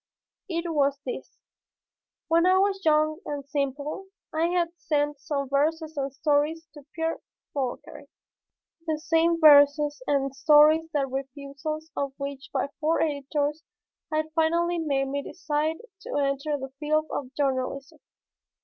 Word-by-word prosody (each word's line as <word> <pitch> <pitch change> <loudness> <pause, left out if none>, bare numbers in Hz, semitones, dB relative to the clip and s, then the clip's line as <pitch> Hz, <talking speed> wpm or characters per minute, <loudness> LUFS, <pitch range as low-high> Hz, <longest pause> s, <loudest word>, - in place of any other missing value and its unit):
It 335 -1 -2
was 280 -2 +2
this: - - -6 0.9
When 335 +2 +4
I 370 0 +5
was 390 0 +1
young 310 0 +3
and 285 -2 -5
simple 285 +5 -3 0.3
I 320 +2 +2
had 345 -1 +1
sent 295 -2 -1
some 280 -1 -3
verses 315 +3 0
and 275 -1 -2
stories 300 +3 0
to 295 -2 -14
Pierre 325 0 -1 0.3
Fauchery, 265 -4 -4 0.8
the 315 -1 0
same 330 +1 +2
verses 290 -1 +6
and 275 -2 +1
stories 310 +2 +5
the 290 -3 +1
refusal 275 +3 -5
of 280 -1 -2
which 280 -1 -6
by 275 0 -1
four 320 +1 +1
editors 295 0 -1 0.5
had 310 0 -1
finally 340 +2 +1
made 275 -4 0
me 280 +1 -2
decide 310 0 -2 0.2
to - - -5
enter 280 +1 0
the 265 -1 -8
field 310 +1 +1
of 260 -2 -4
journalism. 275 0 -2
295 Hz, 135 wpm, -26 LUFS, 280-320 Hz, 0.9 s, verses